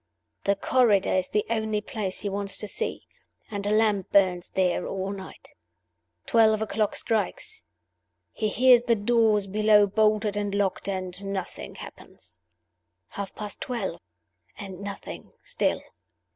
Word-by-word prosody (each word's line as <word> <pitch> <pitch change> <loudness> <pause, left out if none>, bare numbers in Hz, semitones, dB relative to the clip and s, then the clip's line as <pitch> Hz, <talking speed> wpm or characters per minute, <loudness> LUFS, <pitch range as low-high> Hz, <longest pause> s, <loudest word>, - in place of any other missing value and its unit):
The 200 - +3
corridor 210 -2 +3
is 185 -1 +1
the 210 - 0
only 220 -2 -1
place 205 -2 -4
he 205 - -2
wants 200 0 +1
to 210 - -4
see; 455 - -1 0.5
and 205 -1 -3
a - - +1
lamp 210 -3 +2
burns 185 -3 +3
there 180 -1 0
all 190 0 -3
night. 190 -1 -10 0.8
Twelve 220 -2 +4
o'clock 215 -1 -1
strikes; 215 -5 -1 0.7
he 215 - -2
hears 250 +2 +5
the 235 -1 +2
doors 215 -1 +2
below 210 +1 +4
bolted 215 0 +1
and 205 -1 -2
locked, 200 -1 0
and 185 0 -3
nothing 195 -1 -5
happens. 85 - -10 0.7
Half 200 -1 -6
past 210 -1 -4
twelve 215 -9 -3 0.6
and 190 -3 -8
nothing 200 0 -8
still. - - -1
205 Hz, 135 wpm, -26 LUFS, 195-220 Hz, 0.8 s, hears